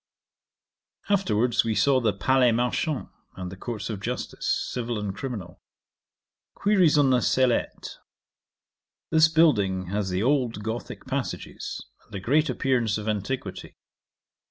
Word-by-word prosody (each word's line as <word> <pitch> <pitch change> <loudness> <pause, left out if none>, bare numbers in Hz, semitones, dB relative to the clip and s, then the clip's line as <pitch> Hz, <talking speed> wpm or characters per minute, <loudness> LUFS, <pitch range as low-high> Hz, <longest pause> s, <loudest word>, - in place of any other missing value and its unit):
'Afterwards 120 - +2
we 115 -1 -1
saw 135 +5 +4
the 110 -3 +2
Palais 125 +4 +3
Marchand, 125 +5 -1 0.3
and 90 -1 -6
the - - -7
Courts 110 +2 -5
of 110 -4 -4
Justice, - - -2
civil 120 -2 -3
and 100 -2 -4
criminal. 105 -10 -6 0.9
Queries 190 -7 +3
on 140 -2 +4
the 125 -1 +3
Sellette. 130 -1 0 1.1
This 160 0 +6
building 105 - +2
has 100 0 -1
the 90 +2 -1
old 125 -5 +1
Gothick 110 +2 -5
passages, 135 0 -4 0.2
and - - -11
a - - -3
great 150 +9 +2
appearance 120 -4 +1
of 105 0 -6
antiquity. 105 -1 -4
120 Hz, 130 wpm, -26 LUFS, 105-135 Hz, 1.1 s, This